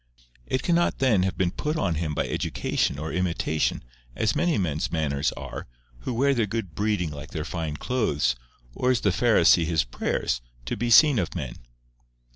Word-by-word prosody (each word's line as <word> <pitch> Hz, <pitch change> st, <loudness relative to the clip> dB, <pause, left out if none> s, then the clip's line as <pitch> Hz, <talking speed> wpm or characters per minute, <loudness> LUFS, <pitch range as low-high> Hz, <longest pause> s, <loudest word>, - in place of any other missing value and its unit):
It 130 Hz, -, -1 dB
cannot 175 Hz, 0 st, +2 dB
then 120 Hz, -8 st, +3 dB
have 95 Hz, 0 st, -1 dB
been 90 Hz, -2 st, +1 dB
put 150 Hz, -, -2 dB
on 85 Hz, -, +1 dB
him 80 Hz, -1 st, -2 dB
by -, -, 0 dB
education -, -, -1 dB
or 80 Hz, +3 st, -4 dB
imitation, 85 Hz, -3 st, 0 dB, 0.3 s
as 110 Hz, -, +1 dB
many 175 Hz, -6 st, +2 dB
men's 80 Hz, -6 st, -1 dB
manners 75 Hz, -3 st, 0 dB
are, -, -, -7 dB, 0.3 s
who 115 Hz, -, -4 dB
wear 140 Hz, +4 st, +3 dB
their 115 Hz, -5 st, +1 dB
good 100 Hz, -5 st, -4 dB
breeding 100 Hz, -3 st, 0 dB
like 75 Hz, +1 st, -8 dB
their 80 Hz, -2 st, -4 dB
fine 80 Hz, -4 st, -4 dB
clothes, 75 Hz, -, 0 dB, 0.4 s
or 125 Hz, -, 0 dB
as 125 Hz, -3 st, +2 dB
the 100 Hz, -, +2 dB
Pharisee 90 Hz, -5 st, +4 dB
his 80 Hz, -1 st, +1 dB
prayers, -, -, -2 dB, 0.2 s
to -, -, -2 dB
be 120 Hz, -, -2 dB
seen 140 Hz, +1 st, +7 dB
of 90 Hz, -2 st, -3 dB
men." 65 Hz, -8 st, -4 dB
90 Hz, 180 wpm, -25 LUFS, 75-120 Hz, 0.4 s, seen